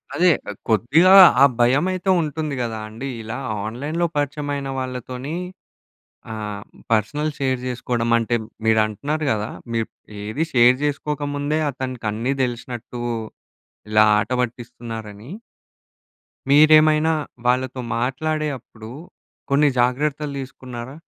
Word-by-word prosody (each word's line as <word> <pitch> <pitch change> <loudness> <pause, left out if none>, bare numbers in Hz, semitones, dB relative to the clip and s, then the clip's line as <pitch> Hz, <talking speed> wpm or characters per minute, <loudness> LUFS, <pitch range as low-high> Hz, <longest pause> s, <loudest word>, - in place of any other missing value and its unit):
అదే, 180 +1 +4 0.4
కొద్దిగా 145 - +5 0.3
ఆ - - +10 0.2
భయమైతే 180 +10 +2
ఉంటుంది 155 -2 -3
గదా 115 -2 -3
అండి. 115 +5 -7
ఇలా 110 +2 -5 0.3
ఆన్లైన్‍లో 145 +10 -2
పరిచయం 145 0 -2
అయిన 140 -1 -4
వాళ్ళతోని 130 +3 -5 1.0
ఆహ్, 105 -2 -5 0.3
పర్సనల్ 145 +8 +1
షేర్ 130 -2 0
జేసుకోవడం 120 -1 -2
అంటే, 115 +1 -1 0.3
మీరు 110 -1 +4
అంటున్నారు 145 +9 -3
గదా, 105 +1 -3 0.2
మీరు 115 -1 0 0.4
ఏది 110 +10 -2
షేర్ 125 0 +6
జేసుకోకముందే 145 0 -1
అతనికి 130 -4 -5
అన్నీ 115 +5 -2
తెలిసినట్టు 120 -1 -5 0.9
ఇలా 110 0 +5
ఆట 105 - -2
పట్టిస్తున్నారని. 115 -2 -6 1.2
మీరేమైనా 155 +2 +6 0.3
వాళ్ళతో 130 +1 +1 0.2
మాట్లాడే 155 +6 -1
అప్పుడు 110 -2 -13 0.6
కొన్ని 145 +1 +4
జాగ్రత్తలు 140 +4 0
తీసుకున్నారా? 130 0 -8
130 Hz, 105 wpm, -22 LUFS, 115-150 Hz, 1.2 s, ఆ